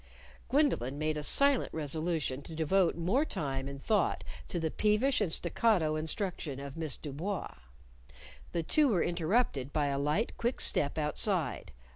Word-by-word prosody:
Gwendolyn 250 - +1
made 155 +1 -1
a 150 - -3
silent 275 - +4
resolution 155 -2 -1
to 160 +3 -10
devote 170 +3 +2
more 185 - +1
time 135 - -3
and 140 0 -7
thought 205 +5 0 0.2
to 175 - -3
the 160 -1 -2
peevish 215 +5 +1
and 190 -6 0
staccato 170 -2 +2
instruction 160 - -2
of 140 -1 -8
Miss 160 -5 -1
Du 145 - -7
Bois. 185 +6 -4 1.0
The 170 - -2
two 300 - +3
were 195 -9 +2
interrupted 170 - 0
by 150 -1 0
a 140 0 -1
light, 150 +11 -1
quick 240 +2 -1
step 145 - +1
outside. 160 +3 +1
165 Hz, 155 wpm, -31 LUFS, 145-210 Hz, 1.0 s, silent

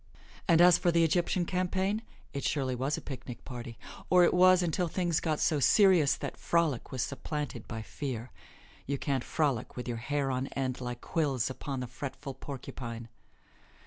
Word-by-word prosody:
And 170 -2 +6
as 175 -1 +7
for 175 - +3
the 170 0 +4
Egyptian 175 +2 +2
campaign, 190 +3 0 0.3
it 140 - -3
surely 135 -3 0
was 135 +4 -1
a - - -6
picnic 125 -3 -8
party, 120 -2 -7 0.3
or 180 -1 +6
it - - +4
was 185 0 +6
until 175 +1 0
things 175 -1 0
got 155 -2 -1
so 155 - +2
serious 180 - +5
that - - -6
frolic 165 -7 0
was 130 -2 -1
supplanted 140 -4 -4
by 110 -2 -5
fear. 125 -2 -5 0.6
You 140 +1 -1
can't 135 -2 -1
frolic 140 -8 -1
with 125 - -5
your 120 -1 -2
hair 140 +3 -1
on 130 +1 -1
end 130 -2 -2
like 125 -1 -5
quills 140 -7 0
upon 135 0 -4
the 125 - -4
fretful 135 +2 -6
porcupine. 120 -4 -7
140 Hz, 175 wpm, -30 LUFS, 125-170 Hz, 0.6 s, as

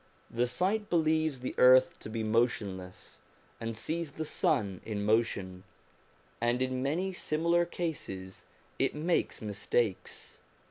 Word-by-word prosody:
The 120 +1 +1
sight 200 - 0
believes 155 -4 +2
the 130 - -3
earth 130 0 +6
to - - -8
be 110 0 -3
motionless, 105 -5 -1 0.4
and 115 -1 -4
sees 160 +4 -3
the 155 +1 -4
sun 100 - 0
in 105 -2 -3
motion, 100 -4 0 0.8
and 120 +1 +2
in 130 0 -1
many 170 +8 -1
similar 170 +1 +1
cases 95 - -4 0.3
it - - +1
makes 165 -5 0
mistakes. 105 0 -2
125 Hz, 125 wpm, -31 LUFS, 105-160 Hz, 0.8 s, earth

